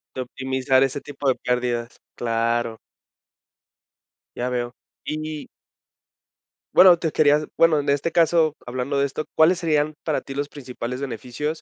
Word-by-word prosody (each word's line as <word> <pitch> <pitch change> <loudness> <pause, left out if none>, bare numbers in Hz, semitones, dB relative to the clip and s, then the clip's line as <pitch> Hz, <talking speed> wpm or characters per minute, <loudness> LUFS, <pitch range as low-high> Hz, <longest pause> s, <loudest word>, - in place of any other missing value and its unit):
De 130 - -2
optimizar 130 +1 +1
ese 135 +1 -1
tipo 145 -1 -5
de 130 - +3
pérdidas, 120 -1 -2 0.2
claro. 115 0 -1 1.6
Ya 125 +1 -1
veo. 120 -1 -2 0.3
Y 155 0 -4 1.3
bueno, 180 -2 +8
te 160 -2 -2
quería 150 0 +3
bueno, 165 -2 +5
en 145 - -2
este 145 +4 +1
caso, 165 -2 +3
hablando 130 +3 -2
de 140 - +3
esto, 140 +2 -4
¿cuáles 165 +3 +5
serían 155 -2 +1
para 155 - -1
ti 135 - -9
los 145 +1 -2
principales 125 -2 -6
beneficios? 140 +5 -4
140 Hz, 140 wpm, -23 LUFS, 125-155 Hz, 1.6 s, bueno